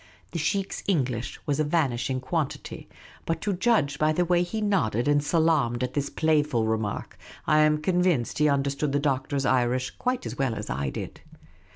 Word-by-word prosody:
The 170 - -3
sheikh's 195 +5 -1
English 130 - -1
was 145 0 0
a - - +3
vanishing 135 -5 0
quantity, 140 +2 -4 0.4
but 165 -1 0
to 205 - 0
judge 180 -7 +1
by 155 0 +3
the 175 +3 +1
way 175 0 +3
he 180 +5 -2
nodded 170 - +1
and 145 0 +3
salaamed 150 -7 +2
at 125 - -3
this 140 -1 -1
playful 150 -7 +1
remark, 110 -2 -3 0.3
I 155 - +4
am 155 0 +4
convinced 175 -6 +1
he 150 0 +4
understood 140 +1 0
the 145 - +2
Doctor's 140 -1 -1
Irish 125 0 +1
quite 250 0 -1
as - - -6
well 130 -4 0
as - - -5
I 70 +2 -1
did. - - -7
145 Hz, 180 wpm, -26 LUFS, 130-165 Hz, 0.4 s, I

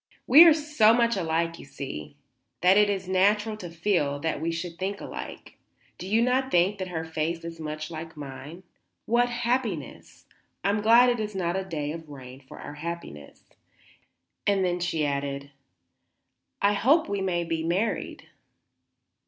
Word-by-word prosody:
"We 305 +7 +9
are 330 - +8
so 295 -8 +4
much 235 -1 +2
alike, 165 -2 -1
you - - -11
see, 75 - -7 0.5
that 185 +2 +5
it 210 0 +5
is 190 -2 -2
natural 210 +4 +2
to 180 -5 -8
feel 170 -4 0
sure 145 - -5
that 160 +1 -2
we 165 +1 -1
should 170 0 -5
think 195 +2 -3
alike. - - -9 0.4
Do 180 - -6
you 220 +4 +3
not 260 +2 +1
think 190 0 +2
that 185 - -3
her 160 -3 -4
face 160 +1 -3
is 165 -1 -7
much 155 0 -5
like 160 0 -8
mine? 145 +5 -9 0.4
What 240 +2 +2
happiness! 240 0 -3 0.4
I - - +2
am 210 +1 0
glad 235 +3 +6
it 240 -1 0
is 210 -1 -4
not 175 -2 -1
a 190 - -1
day 150 -6 -4
of 160 -1 -8
rain 130 -2 -10
for 130 - -13
our - - -8
happiness." 170 - -7 1.0
And 185 -3 +1
she 170 -3 -1
then 145 - +1
added, 140 0 -5 1.1
"I 200 +1 +4
hope 280 +10 +3
we 200 -1 -2
may 175 -2 0
be 165 -1 -2
married." 185 +7 -2
180 Hz, 170 wpm, -26 LUFS, 160-210 Hz, 1.1 s, We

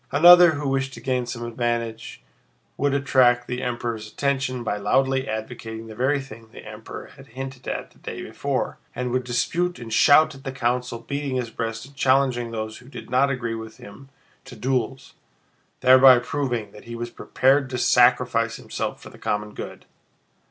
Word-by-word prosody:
Another 175 +3 +8
who 145 -1 -3
wished 135 0 -1
to - - -9
gain 125 -2 -1
some 120 -1 -5
advantage 120 -1 -3 0.5
would 140 0 0
attract 125 -3 +3
the 125 0 -4
Emperor's 115 -3 -4
attention 135 -3 -1
by 105 -2 -2
loudly 130 +6 +1
advocating 110 0 -6
the 110 - -9
very 130 +6 +1
thing 115 -4 -11
the - - -13
Emperor - - -9
had - - -14
hinted 135 -1 -7
at - - -4
the - - -24
day - - -7
before, - - -3 0.2
and 125 -1 -3
would 130 +1 0
dispute 165 +9 -1
and 115 -2 -7
shout 155 +5 +6
at 135 -1 -14
the 135 - -4
council, 125 -1 -1
beating 140 +3 -4
his 120 -3 -2
breast 115 +1 -4
and 140 +1 -17
challenging 130 -3 +2
those 110 -1 -5
who 125 +1 -16
did 120 -4 -10
not 135 +2 +3
agree 120 -4 -2
with 110 -1 -8
him 135 +7 -13 0.4
to 135 -2 -11
duels, 130 +2 -2 0.7
thereby 130 0 +8
proving 120 -4 -3
that 105 - -14
he 120 0 -7
was 120 0 -5
prepared 135 +3 +1
to 125 - -3
sacrifice 120 -2 +3
himself - - -5
for - - -12
the - - -16
common 105 0 -2
good. - - -8
125 Hz, 180 wpm, -23 LUFS, 115-135 Hz, 0.7 s, Another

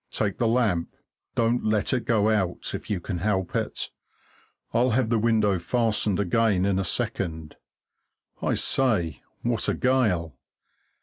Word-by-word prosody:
Take 105 -2 -2
the 120 - +2
lamp 110 -8 +1 0.4
don't 115 +1 +1
let 110 +1 +1
it 125 -3 -1
go 110 -2 +3
out, 95 -5 -1
if - - -6
you 100 - 0
can 90 0 -4
help 95 -1 -1
it - - -2 0.8
I'll 120 +2 +3
have 130 -4 +1
the 115 - +3
window 105 -4 +2
fastened 105 +1 +1
again 100 0 +2
in 100 -1 +1
a - - 0
second 85 -6 -2 0.9
I - - +1
say, 110 -11 +1 0.2
what 120 -2 0
a - - +1
gale! 110 - +1
105 Hz, 145 wpm, -25 LUFS, 95-115 Hz, 0.9 s, go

